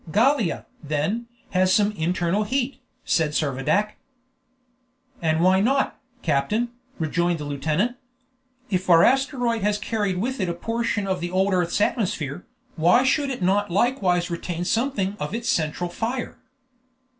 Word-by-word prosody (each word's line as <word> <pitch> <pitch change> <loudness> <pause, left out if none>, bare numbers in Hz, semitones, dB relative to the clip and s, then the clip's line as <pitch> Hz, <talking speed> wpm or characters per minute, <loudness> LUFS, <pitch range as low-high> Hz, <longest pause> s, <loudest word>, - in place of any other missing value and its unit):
"Gallia, 230 - +2 0.2
then, 155 +11 -2 0.2
has 185 0 +3
some 205 +2 +4
internal 180 +2 0
heat," 260 +4 -1 0.3
said 155 -3 +1
Servadac. 150 +9 0 1.2
"And 160 -1 +1
why 185 +2 +5
not, 270 +6 +1 0.2
captain?" 170 +11 +1 0.3
rejoined 170 +1 0
the 150 - -6
lieutenant. 155 - -1 0.7
"If 185 -1 -1
our 170 -1 +7
asteroid 245 -3 +2
has 205 +1 +1
carried 210 -3 -1
with 250 +7 -2
it 185 -3 0
a 170 - -2
portion 225 +1 -1
of 190 -2 -1
the 175 0 -3
old 190 +2 +1
earth's 180 0 +1
atmosphere, 180 - -1 0.3
why 175 +10 +4
should 280 +2 +2
it 250 -8 -4
not 205 +3 +2
likewise 185 -4 +1
retain 170 0 -3
something 215 -3 0
of 150 +8 -3
its 235 0 -3
central 160 +2 0
fire?" 235 +6 -3
190 Hz, 140 wpm, -24 LUFS, 170-230 Hz, 1.2 s, our